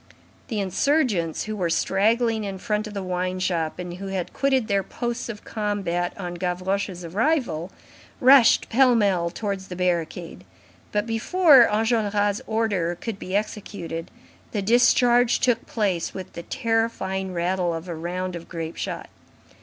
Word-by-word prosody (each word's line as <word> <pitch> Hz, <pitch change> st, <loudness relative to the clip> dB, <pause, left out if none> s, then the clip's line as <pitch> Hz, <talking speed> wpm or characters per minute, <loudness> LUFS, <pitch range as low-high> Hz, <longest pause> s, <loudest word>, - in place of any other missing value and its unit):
The 220 Hz, -4 st, -2 dB
insurgents 200 Hz, -, +1 dB
who 215 Hz, 0 st, -4 dB
were 180 Hz, -4 st, -1 dB
straggling 220 Hz, +6 st, +1 dB
in 195 Hz, -2 st, -4 dB
front 210 Hz, +1 st, -2 dB
of 210 Hz, -, -9 dB
the 200 Hz, -, -3 dB
wine 185 Hz, 0 st, -2 dB
shop, 170 Hz, -4 st, -1 dB
and 175 Hz, -1 st, -6 dB
who 195 Hz, +1 st, -6 dB
had 190 Hz, -2 st, -3 dB
quitted 265 Hz, -4 st, +1 dB
their 200 Hz, -2 st, +2 dB
posts 240 Hz, +5 st, -4 dB
of 210 Hz, -3 st, -7 dB
combat 200 Hz, -5 st, -2 dB
on 180 Hz, -3 st, -5 dB
Gavroche's 185 Hz, 0 st, -2 dB
arrival, 200 Hz, -, 0 dB, 0.5 s
rushed 260 Hz, -2 st, +6 dB
pell 250 Hz, +1 st, +4 dB
mell 190 Hz, -6 st, +2 dB
towards 195 Hz, 0 st, -4 dB
the 180 Hz, -, -7 dB
barricade; 170 Hz, -, -2 dB, 0.5 s
but 210 Hz, 0 st, 0 dB
before 260 Hz, +4 st, +5 dB
Enjolras' 210 Hz, -2 st, +1 dB
order 200 Hz, -6 st, 0 dB
could 225 Hz, -4 st, -5 dB
be 185 Hz, -, -4 dB
executed, 200 Hz, -5 st, -4 dB, 0.4 s
the 205 Hz, -3 st, -1 dB
discharge 240 Hz, +2 st, +4 dB
took 240 Hz, -2 st, +1 dB
place 195 Hz, -7 st, -1 dB
with 190 Hz, -2 st, -7 dB
the 170 Hz, -, -6 dB
terrifying 225 Hz, -5 st, -1 dB
rattle 175 Hz, 0 st, 0 dB
of 165 Hz, +2 st, -5 dB
a 175 Hz, -, -4 dB
round 180 Hz, +3 st, -4 dB
of 170 Hz, -1 st, -9 dB
grape 165 Hz, -1 st, -5 dB
shot. -, -, -4 dB
200 Hz, 150 wpm, -24 LUFS, 180-225 Hz, 0.5 s, rushed